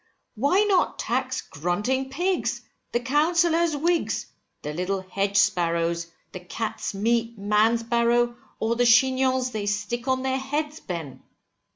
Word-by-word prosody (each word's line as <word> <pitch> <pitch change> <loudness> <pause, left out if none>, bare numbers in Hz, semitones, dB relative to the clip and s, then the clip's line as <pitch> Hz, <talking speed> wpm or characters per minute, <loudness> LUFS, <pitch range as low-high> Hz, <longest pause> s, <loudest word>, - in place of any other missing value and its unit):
Why 285 - +2
not 400 -3 +2
tax 260 +1 -1
grunting 210 - -2
pigs, 355 +7 -1 0.3
the 240 - +1
counsellor's 325 +4 +2
wigs, 340 +3 0 0.4
the 150 - -4
little 185 +4 -2
hedge 195 +2 -1
sparrows, 170 -4 +1 0.2
the 185 - -7
cat's 215 +4 -4
meat 230 +2 0
man's 210 +3 +2
barrow, 235 +1 +2 0.2
or 225 +1 0
the 245 - +2
chignons 260 +1 +3
they 210 -3 -3
stick 210 +5 -2
on 260 0 +1
their 265 0 0
heads, 295 +3 -3
Ben. 165 - -6
235 Hz, 135 wpm, -25 LUFS, 200-265 Hz, 0.4 s, chignons